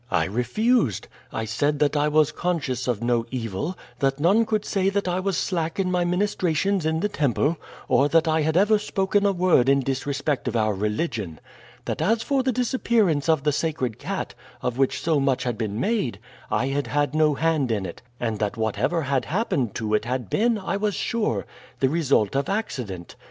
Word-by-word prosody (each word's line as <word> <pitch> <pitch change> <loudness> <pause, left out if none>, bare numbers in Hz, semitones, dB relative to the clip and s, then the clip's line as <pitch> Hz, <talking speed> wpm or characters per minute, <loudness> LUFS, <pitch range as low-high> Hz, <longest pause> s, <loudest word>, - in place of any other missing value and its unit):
I 80 - +2
refused. 125 - +1 0.2
I 110 - -3
said 145 +7 0
that 145 +1 +1
I 145 0 +2
was 150 0 +3
conscious 140 -8 -2
of 120 -2 -1
no 120 -1 +1
evil, 125 - -3 0.2
that 135 0 +1
none 200 +9 +3
could 215 -1 0
say 195 -1 +1
that 200 -1 -1
I 180 +1 0
was 195 0 -1
slack 165 -1 -2
in 185 -1 +1
my 180 -1 +2
ministrations 180 -1 0
in 160 +1 0
the 210 - +2
temple, 150 - 0 0.3
or 140 +2 +3
that 165 +1 +3
I 160 0 +2
had 160 +2 +1
ever 210 +2 +4
spoken 200 0 +1
a - - +3
word 175 -9 +3
in 140 0 +4
disrespect 135 +1 -2
of 120 - -2
our 110 -2 +2
religion. 105 - -2 0.5
That - - -3
as 225 +7 +2
for 275 -2 +1
the 260 0 +1
disappearance 225 - +1
of 160 -4 +3
the 150 - +2
sacred 140 -7 -2
cat, - - -4 0.3
of 125 +1 -2
which 135 - +2
so 160 -3 +1
much 135 -2 +1
had 120 -2 -1
been 110 -2 -3
made, 140 - 0 0.3
I 120 +6 0
had 140 +1 -1
had 145 -1 0
no 155 -1 +3
hand 155 -4 +1
in 105 -4 -1
it, 85 - -8 0.2
and 115 -3 -2
that 105 0 -1
whatever 115 +9 0
had 135 -1 0
happened 145 - -1
to 110 -2 -2
it 105 - +2
had 125 -4 -3
been, 230 +1 +2
I 195 -1 -2
was 205 -1 -1
sure, 230 -2 -1 0.3
the 130 - +3
result 140 -9 +1
of 140 - 0
accident. 120 - -4
150 Hz, 200 wpm, -24 LUFS, 125-185 Hz, 0.5 s, ever